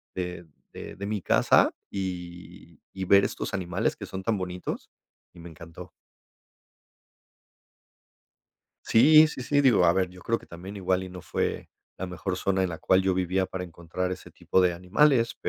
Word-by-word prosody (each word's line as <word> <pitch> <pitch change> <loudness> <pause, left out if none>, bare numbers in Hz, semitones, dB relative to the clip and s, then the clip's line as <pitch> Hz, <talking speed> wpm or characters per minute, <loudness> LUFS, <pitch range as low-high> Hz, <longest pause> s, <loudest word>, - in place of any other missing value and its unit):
de 90 -2 -5 0.3
de - - -9
de 100 - -6
mi 105 -2 -3
casa - - +4 0.2
y 90 -2 -7
y 95 -1 -4
ver 100 +1 +6
estos - - -4
animales 90 -1 -1
que 100 - -8
son 95 0 -6
tan 105 -2 0
bonitos, 90 0 -5 0.5
y - - -13
me 85 +1 -10
encantó. 80 +1 -11 3.0
Sí, 155 +7 +7
sí, 130 -5 -7
sí, 145 +2 +2
digo, 105 -10 +5
a 85 - +5
ver, 95 -1 0
yo 90 0 -14
creo 115 +3 -1
que - - -17
también 95 +4 -10
igual 95 -1 0
y 95 - -8
no 90 -1 -10
fue - - -3 0.3
la 95 - -5
mejor 90 +1 -4
zona 95 0 0
en 95 - 0
la 80 - -5
cual 95 - +3
yo 95 -1 +1
vivía 95 +1 0
para 95 -1 -5
encontrar 85 +2 -4
ese 90 - -9
tipo 95 - 0
de 90 -1 +2
animales, 115 - +2
95 Hz, 175 wpm, -26 LUFS, 90-100 Hz, 3.0 s, Sí